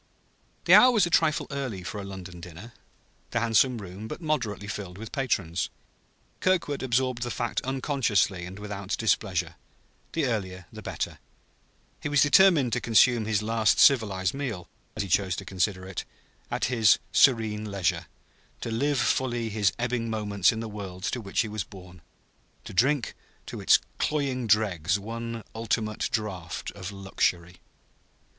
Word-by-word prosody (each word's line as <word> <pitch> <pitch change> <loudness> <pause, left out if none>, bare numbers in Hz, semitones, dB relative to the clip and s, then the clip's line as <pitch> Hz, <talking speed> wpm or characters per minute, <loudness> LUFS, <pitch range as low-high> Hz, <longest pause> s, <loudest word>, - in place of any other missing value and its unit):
The - - +6
hour 255 - +9
was 220 -7 +4
a 175 - -4
trifle 155 -2 +3
early 130 -10 -4
for 105 +4 -5
a - - -5
London 95 -3 -9
dinner, 90 +7 -10 0.6
the 120 - 0
handsome 115 +2 +3
room 100 +1 -8
but - - -6
moderately 120 - -2
filled 95 -2 -6
with 110 +1 -8
patrons. 100 - -1 0.7
Kirkwood 175 -6 +1
absorbed 130 -1 0
the 120 - -2
fact 120 -1 -2
unconsciously 130 - 0
and 95 +2 -9
without 100 -1 -4
displeasure; 90 -7 0 0.6
the 160 -3 +1
earlier, 95 -7 -3
the - - -8
better: - - -4 0.8
he 150 - -3
was 145 -1 +4
determined 150 -5 +5
to 125 - 0
consume 115 0 +4
his 105 -1 0
last 110 -1 +2
civilized 100 -8 +4
meal 120 -11 -4 0.3
(as 105 - -1
he - - -6
chose 95 0 +1
to 95 - -7
consider 95 0 -1
it) 95 -1 -5 0.5
at - - -1
his 115 -3 +4
serene 110 -5 +3
leisure, 90 -3 -1 0.5
to 115 - -4
live 140 +5 +1
fully 120 -1 0
his 100 -3 +2
ebbing 120 -1 -1
moments 105 -4 +2
in 110 - -4
the 115 - -4
world 95 -3 -8
to 125 - -2
which 100 -2 0
he 115 - -2
was 105 -1 -3
born, 90 -3 -13 0.6
to - - -9
drink 130 +6 +2 0.3
to - - -7
its - - +6 0.2
cloying 135 -5 -1
dregs 100 -5 +2
one 115 +2 -6
ultimate 110 -1 -1
draught 100 -8 -3
of 100 -1 -7
luxury. 90 -3 -1
110 Hz, 155 wpm, -27 LUFS, 95-125 Hz, 0.8 s, hour